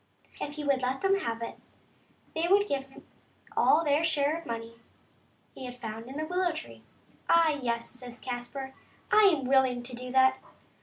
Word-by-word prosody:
If 290 - -4
he 300 - -5
would 275 -2 +2
let 255 +1 -1
them 390 0 +3
have 230 -8 -3
it, - - -7 0.7
they 325 +1 0
would 405 +3 +4
give 275 -4 -1
him 270 - -16 0.5
all 315 - +5
of - - -4
their 290 +2 +3
share 300 -2 +2
of 335 0 -7
the 235 - -4
money 230 0 -6 0.7
he 260 - -8
had 250 0 -7
found 225 -1 -7
in 270 +2 -7
the 310 - -2
willow 360 +1 +1
tree. 310 - -8 0.3
*' - - -31
Ah, 335 -1 +6
yes," 235 -1 -1
says 250 -1 -9
Caspar, 260 +2 -5 0.2
" - - -32
I 430 -1 +7
am 320 -9 +4
willing 260 -2 +3
to 245 0 -5
do 250 +1 -7
that. 260 0 +4
265 Hz, 205 wpm, -29 LUFS, 245-315 Hz, 0.7 s, I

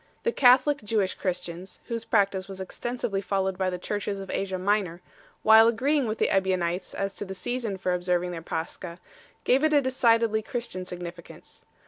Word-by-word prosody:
The 470 - +2
Catholic 270 - +5
Jewish 205 -3 0
Christians, 180 0 -5
whose 230 -1 -4
practice 195 -3 +1
was 195 -1 -8
extensively 200 +1 -3
followed 190 -1 -1
by 185 0 0
the 180 - -3
Churches 205 +2 -3
of 195 -1 -7
Asia 190 -1 -2
Minor, 185 -2 0 0.4
while 220 +1 +8
agreeing 265 +4 +1
with 215 0 -2
the - - +1
Ebionites 185 -2 0
as 195 0 -2
to - - -6
the 190 -1 -7
season 235 -2 -3
for 185 -1 -1
observing 180 0 0
their 170 -2 -6
Pascha, 170 +1 -5 0.5
gave 265 +4 +3
it 310 0 +3
a - - +7
decidedly 230 -4 +2
Christian 220 -5 -5
significance. 175 -1 -9
195 Hz, 170 wpm, -26 LUFS, 180-230 Hz, 0.5 s, while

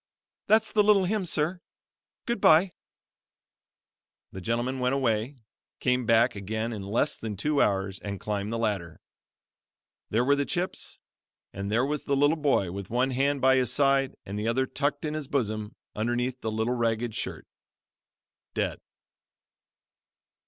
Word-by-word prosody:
"That's 220 +1 +4
the 215 - +4
little 205 -2 +5
hymn, 200 -1 -1
sir; 170 +3 -1 0.6
Goodbye." 190 -6 +4 1.6
The 95 - -7
gentleman 120 +5 -1
went 125 +1 +1
away, 120 0 0 0.4
came 125 -2 +1
back 115 +1 +4
again 110 +4 -3
in 105 - -5
less 110 +9 0
than 110 -3 -6
two 145 +8 +1
hours 95 -1 0
and 100 -1 -5
climbed 105 0 -3
the 115 - -1
ladder. 100 -8 -2 1.1
There 115 +3 +1
were 140 +2 +4
the 140 - +1
chips 180 +4 -3 0.6
and 100 +1 -4
there 120 +4 +2
was 150 +1 -3
the 140 - +1
little 145 +3 +3
toy 115 -11 +2
with 100 0 -6
one 125 +3 +1
hand 140 +2 +1
by 130 0 +5
his 125 -2 +1
side 135 0 +2
and 100 +2 -5
the 105 - -2
other 130 +3 +2
tucked 145 +3 -2
in 150 - -2
his 155 -3 -4
bosom 110 -4 -2 0.2
underneath 120 +3 -1
the 110 - -2
little 110 +3 0
ragged 115 -1 0
shirt - - -5 1.1
dead. - - -1
125 Hz, 150 wpm, -27 LUFS, 110-145 Hz, 1.6 s, little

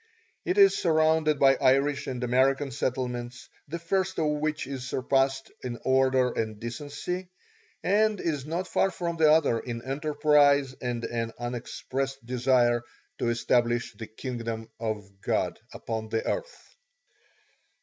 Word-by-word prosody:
It 365 - 0
is 395 -1 +7
surrounded 160 -2 +3
by 135 -1 +5
Irish 140 +2 +2
and 125 -1 -4
American 135 +3 +2
settlements, 125 -1 -3 0.2
the 160 +4 -4
first 185 +3 -1
of 160 - +1
which 155 -1 -1
it 135 0 -5
surpasses 135 +1 0
in 120 -2 -4
order 130 -1 +3
and 110 -2 -3
decency, 145 +9 -5 0.5
and 210 +2 +2
is 150 -5 -2
not 170 +5 -3
far 195 - +2
from 170 -2 -4
the 155 -1 +5
other 150 -7 +3
in 115 0 -6
enterprise 145 -1 +3
and 120 -2 -3
an 115 -1 -3
unexpressed 130 +2 -4
desire 120 -1 +2 0.4
to 120 - +1
establish 120 0 +1
the 110 - -8
kingdom 115 -2 -5
of 110 -3 -3
God - - -1
upon 110 -1 -5
the 110 0 -1
earth. - - -5
135 Hz, 135 wpm, -27 LUFS, 120-155 Hz, 0.5 s, is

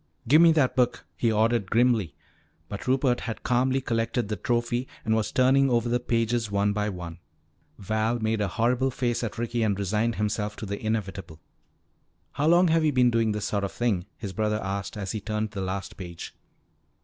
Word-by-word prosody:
"Give 150 +6 +6
me 170 -1 +7
that 145 -5 +2
book!" 125 -1 +1
he 115 - +1
ordered 110 -2 +1
grimly. 115 - +2 0.5
But 100 - -7
Rupert 130 -1 +2
had 115 -3 -6
calmly 130 +2 +1
collected 115 -2 -1
the 105 - -1
trophy 120 +4 -1 0.2
and 110 - +2
was 110 -1 0
turning 135 +1 +4
over 120 -1 +1
the 120 +1 +1
pages 115 -2 0
one 100 0 +1
by 105 0 -1
one. 90 -3 -7 0.6
Val 110 +4 -1
made 110 -1 -1
a 100 - +1
horrible 125 +6 +1
face 120 -2 -1
at 115 0 -4
Ricky 120 0 -2
and 105 -3 +1
resigned 105 +4 0
himself 105 0 -2
to - - -7
the 100 +2 -5
inevitable. 100 -6 -3 0.9
"How 145 - -1
long 175 +1 +5
have 165 0 +3
you 155 - +3
been 125 -2 +3
doing 115 -1 +2
this 105 -1 -3
sort 100 -1 -1
of 100 - -3
thing?" 100 -7 -1
his 100 -4 -6
brother 105 +2 0
asked 100 +1 -4
as 95 -2 -4
he 110 - -4
turned 105 +1 -3
the 100 -3 -5
last 95 +1 -4
page. 85 -3 -8
110 Hz, 195 wpm, -26 LUFS, 100-120 Hz, 0.9 s, me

